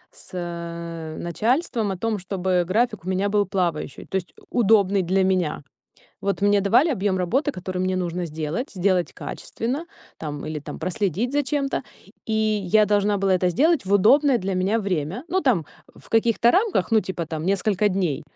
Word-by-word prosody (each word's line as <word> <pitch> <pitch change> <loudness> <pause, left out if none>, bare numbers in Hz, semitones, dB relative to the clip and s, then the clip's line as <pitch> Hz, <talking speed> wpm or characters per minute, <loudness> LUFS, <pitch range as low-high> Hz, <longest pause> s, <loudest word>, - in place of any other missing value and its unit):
с 170 - -6
начальством 225 - 0
о 190 - -4
том, 220 +2 -1
чтобы 185 -1 0
график 215 +1 0
у 185 - -4
меня 190 +2 0
был 205 -1 +2
плавающий, 175 -7 -2
то - - -22
есть 185 -2 -2 0.2
удобный 205 -4 +4
для 190 +2 +1
меня. 185 -6 0 0.6
Вот 200 0 -1
мне 205 0 +4
давали 235 - +4
объем 200 -6 0
работы, 255 - +1
который 185 -6 -5
мне 185 0 0
нужно 175 -1 -2
сделать. 160 - -4
Сделать 185 -2 +1
качественно, 265 +9 -5 0.3
там 150 -2 -5
или 155 -1 -4
там 145 - -8
проследить 200 - -1
за 290 0 +2
чем-то. 280 -1 -1 0.4
И 225 - -2
я 215 -2 +3
должна 205 0 +2
была 195 -1 +2
это 180 0 +2
сделать 300 - +2
в 195 - -2
удобное 265 +7 +5
для 190 -1 -2
меня 190 +5 +1
время. 190 - -2
Ну 375 +3 +1
там, 220 - +1 0.3
в - - -17
каких-то 230 +1 +3
рамках, 395 - +1
ну, 220 - +6
типа 180 -5 -4
там, 160 0 -4
несколько 200 +2 +1
дней, 175 -7 -1
195 Hz, 175 wpm, -23 LUFS, 175-225 Hz, 0.6 s, ну